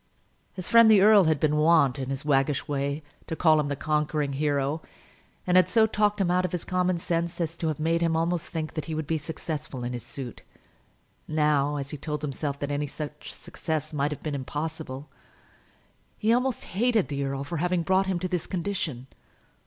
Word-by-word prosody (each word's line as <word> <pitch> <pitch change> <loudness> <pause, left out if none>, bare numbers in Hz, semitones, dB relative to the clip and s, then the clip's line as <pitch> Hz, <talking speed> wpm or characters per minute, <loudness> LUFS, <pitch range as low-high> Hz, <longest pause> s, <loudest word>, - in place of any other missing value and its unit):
His 185 - -6
friend 230 -1 +7
the 210 -3 +7
earl 205 -2 +7
had 155 -2 +2
been 150 0 +2
wont, 150 -4 +4
in 130 -1 -4
his 135 +1 -3
waggish 140 0 +1
way, 140 +1 -2 0.2
to 160 - -3
call 155 -2 +4
him 150 - 0
the 145 - -2
conquering 150 -1 0
hero, 145 +1 0 0.6
and 180 - +2
had 185 - +6
so 225 -1 +5
talked 210 -1 +1
him 180 -3 +2
out 180 +1 +2
of 180 - -2
his 175 - -2
common 185 -1 +1
sense 170 +1 -2
as 165 -3 -2
to 165 - -2
have 155 -2 -2
made 165 +2 +1
him 165 -1 +2
almost 170 +1 0
think 160 -2 -4
that 155 -3 -4
he 160 - -4
would 155 0 -2
be 160 +1 -1
successful 150 -3 -5
in 120 +1 -3
his 120 - -4
suit. 125 +1 -8 0.9
Now, 150 -2 +2
as 140 -1 -4
he 150 - -5
told 150 +1 -4
himself 140 0 -3
that 145 0 -2
any 145 +1 -1
such 150 +1 -7
success 155 -1 -4
must 145 0 +1
have 150 - -7
been 155 - -3
impossible, 145 0 -5 1.1
he 220 +2 +2
almost 250 -1 0
hated 225 +1 +1
the 140 -1 -2
earl 135 0 -2
for 170 +4 -4
having 175 +1 0
brought 190 +3 +2
him 190 -2 0
to 185 - -1
this 180 -3 -2
condition. 175 -8 -3
155 Hz, 205 wpm, -27 LUFS, 145-180 Hz, 1.1 s, friend